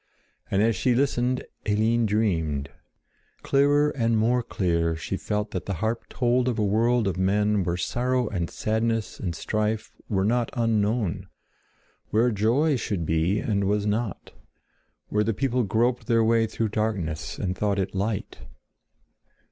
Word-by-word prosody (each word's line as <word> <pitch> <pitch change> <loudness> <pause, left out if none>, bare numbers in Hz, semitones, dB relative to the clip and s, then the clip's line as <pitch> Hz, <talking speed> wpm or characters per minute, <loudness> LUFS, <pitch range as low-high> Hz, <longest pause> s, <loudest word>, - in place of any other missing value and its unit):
And 100 +2 +2
as 115 0 +2
she 125 -2 +1
listened, 125 -1 +1 0.2
Eline 110 +2 +2
dreamed. 80 -10 0 0.7
Clearer 145 +2 +3
and 115 -4 +1
more 120 +3 +2
clear 85 -7 0
she 80 - -4
felt 105 0 -2
that - - -4
the 100 - -1
harp 110 +7 -2
told 125 0 +1
of 120 -3 0
a 105 - +1
world 115 +2 +2
of 95 - -1
men 105 +1 +2
where 85 0 -1
sorrow 125 +6 0
and 85 -5 -2
sadness 110 0 -1
and 85 -3 -3
strife 110 0 -2 0.2
were 95 -2 +1
not 120 +2 +1
unknown; 110 -4 0 0.8
where 115 +3 +3
joy 125 +8 +2
should 100 -8 -2
be, 80 +5 +1
and 100 -2 0
was 105 +1 +1
not; 105 -1 -2 0.8
where 105 0 +1
the 110 0 -1
people 130 +1 0
groped 120 +3 0
their 115 -2 +3
way 115 0 +3
through 110 0 -2
darkness 100 -8 -2
and 95 -2 -2
thought 100 0 0
it 95 -1 -1
light. 100 +2 -3
110 Hz, 150 wpm, -25 LUFS, 100-120 Hz, 0.8 s, Clearer